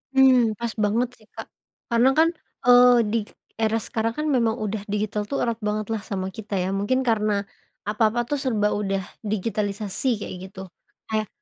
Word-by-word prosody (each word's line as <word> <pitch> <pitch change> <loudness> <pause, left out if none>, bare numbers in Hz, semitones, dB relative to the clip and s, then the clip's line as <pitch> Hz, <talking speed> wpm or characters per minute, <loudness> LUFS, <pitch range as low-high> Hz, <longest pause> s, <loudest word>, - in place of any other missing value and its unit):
Mmm, 265 -1 +7 0.2
pas 235 -1 -3
banget 230 +4 +1
sih 215 - -22
Kak - - -8 0.4
karena 235 +3 +4
kan, 325 +1 +6 0.4
eee, 245 0 +8 0.2
di 230 - +2
k - - -18 0.3
era 220 +1 +2
sekarang 225 0 -1
kan 305 0 -1
memang 230 -3 +2
udah 210 0 -3
digital 210 0 -1
tuh 275 - -1
erat 235 -1 -1
banget 210 0 -1
lah 220 - -2
sama 190 -2 -2
kita 215 -1 -7
ya - - -1
mungkin 255 +6 +1
karena 215 -1 +2 0.6
apa-apa 215 +2 +2
tuh 290 - 0
serba 215 -5 +1
udah 195 -1 -1 0.3
digitalisasi 210 +1 -1
kayak 205 - -6
gitu. 190 0 -10 0.5
Kayak 215 -1 -1
220 Hz, 175 wpm, -24 LUFS, 210-240 Hz, 0.6 s, eee